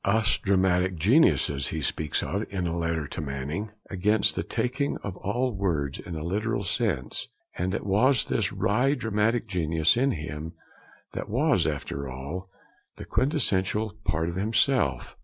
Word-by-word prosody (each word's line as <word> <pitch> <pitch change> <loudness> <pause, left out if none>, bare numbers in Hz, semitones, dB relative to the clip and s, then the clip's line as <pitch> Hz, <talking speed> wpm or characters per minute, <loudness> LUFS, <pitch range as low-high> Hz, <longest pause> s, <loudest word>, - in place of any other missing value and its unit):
'Us 105 0 +2
dramatic 95 -1 +2
geniuses,' 80 - +3
he 80 - -3
speaks 75 +1 0
of, 100 +3 -2
in 95 -3 -2
a 85 0 -1
letter 80 -2 -1
to - - -5
Manning 75 +9 -4 0.2
against 105 +3 +2
the - - 0
taking 140 +3 -1
of 100 -3 -4
all 125 +5 -1
words 80 -8 -1
in 85 - -7
a 75 - -4
literal 105 +4 -1
sense; 95 - -1 0.3
and 95 +2 -1
it - - -4
was 110 +5 +3
this - - 0
wry 125 +7 +2
dramatic 110 0 0
genius 80 -5 +2
in 130 +4 +2
him 75 +1 -6 0.6
that - - -5
was, - - +2
after 70 -1 -3
all, 70 +9 -6 0.5
the - - -8
quintessential 110 - +1
part 80 +1 0
of 85 - -3
himself. 115 +7 +1
95 Hz, 155 wpm, -27 LUFS, 80-110 Hz, 0.6 s, geniuses